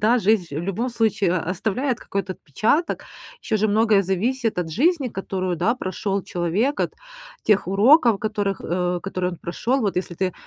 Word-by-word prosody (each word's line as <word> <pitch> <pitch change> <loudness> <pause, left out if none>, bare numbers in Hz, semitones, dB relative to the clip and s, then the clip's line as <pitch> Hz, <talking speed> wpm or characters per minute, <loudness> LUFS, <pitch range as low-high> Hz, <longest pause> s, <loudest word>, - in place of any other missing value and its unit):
да, 235 +4 +4
жизнь, 195 -7 +1
в - - -3
любом 195 +7 -2
случае, 220 -6 +1
оставляет 220 - -1
какой-то 195 -1 -3
отпечаток. 215 - -1 0.4
Еще 220 - 0
же 215 +1 +1
многое 215 -1 +4
зависит 225 +4 -1
от 165 -2 -2
жизни, 285 - +2
которую, 185 -3 -3
да, 230 +8 +1
прошел 195 -3 -3
человек, 180 - -1
от - - -1 0.5
тех 210 -5 +2
уроков, 230 - +5
которых, 205 -2 -2
э, 180 0 -1
которые 185 -2 -2
он - - -7
прошел. 235 +11 -1
Вот 200 -6 -1
если 180 -1 -2
ты, 185 0 -1
200 Hz, 165 wpm, -23 LUFS, 185-230 Hz, 0.5 s, уроков